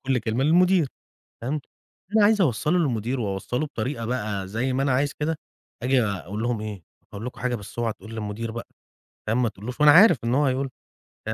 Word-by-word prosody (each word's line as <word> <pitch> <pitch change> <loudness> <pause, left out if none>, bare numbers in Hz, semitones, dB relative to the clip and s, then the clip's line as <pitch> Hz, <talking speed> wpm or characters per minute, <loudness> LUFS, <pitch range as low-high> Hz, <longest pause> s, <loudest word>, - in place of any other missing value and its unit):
كل 130 -2 +2
كلمه 115 +3 -1
للمدير 175 +1 +4 0.6
فاهم، 135 +5 -1 0.6
اللي 215 - 0
أنا 205 - +6
عايز 210 -1 +4
أوصّله 155 +3 +2
للمدير 125 -4 0
وأوصّله 105 +7 -2
بطريقة 115 -2 -4
بقى 105 -5 -2
زي 120 +6 -1
ما 135 +1 0
أنا 135 -2 +2
عايز 140 +2 +1
كده، 160 +1 0 0.5
آجي 130 -1 +3
أقول 100 +1 -3
لهم 120 -2 -1
إيه: 105 -6 -6 0.3
"هاقول 105 +4 -6
لكم 125 - -7
حاجة 125 -1 0
بس 105 +1 -8
أوعا 115 -2 0
تقول 110 - -13
للمدير 110 +1 -4
بقى." 115 +1 -6 0.6
فاهم، 115 +4 +1
ما 115 - +2
تقولش 115 +8 -8
له 150 - +6
وأنا 145 - +10
عارف 210 - +7
إن 120 +2 +1
هو 145 +1 +3
هيقول 130 +1 +1 0.6
له. 110 - -2
125 Hz, 205 wpm, -25 LUFS, 110-140 Hz, 0.6 s, وأنا